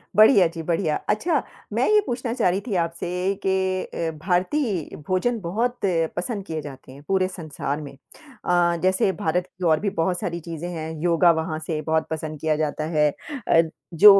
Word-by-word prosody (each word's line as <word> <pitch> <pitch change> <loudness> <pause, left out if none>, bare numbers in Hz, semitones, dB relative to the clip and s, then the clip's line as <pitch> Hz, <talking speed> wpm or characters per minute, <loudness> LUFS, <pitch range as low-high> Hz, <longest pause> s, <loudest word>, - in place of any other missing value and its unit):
बढ़िया, 215 -4 +7
जी 165 0 -7
बढ़िया। 165 -1 0
अच्छा 295 +6 +2 0.3
मैं 240 +4 +2
ये 425 0 +6
पूछना 245 -2 -2
चाह 235 - +2
रही 190 +3 0
थी 210 - -1
आपसे 175 +2 -1
कि 190 -1 +1
अ, 165 -1 -3
भारतीय 185 - 0
भोजन 220 +6 +1
बहुत 230 +8 -1 0.4
पसंद 200 0 -3
किए 160 -3 -4
जाते 135 -3 -10
हैं 135 +2 -12
पूरे 190 -1 +2
संसार 155 -4 -4
में। 145 - -8 0.5
अ, 175 -1 +3
जैसे 190 +1 +3
भारत 180 -2 -1
की 180 -1 -6
और 155 -1 +4
भी 205 - 0
बहुत 180 -1 0
सारी 170 -1 -3
चीज़ें 170 +1 -6
हैं 160 -2 -4
योगा 170 0 +5
वहाँ 160 -1 -2
से 155 -1 -3
बहुत 160 0 0
पसंद 155 -1 -4
किया 155 -1 +2
जाता 155 0 -1
है। 150 0 +5 0.4
अ, 165 - +6 0.3
जो 195 +4 +9
175 Hz, 180 wpm, -24 LUFS, 160-195 Hz, 0.5 s, जो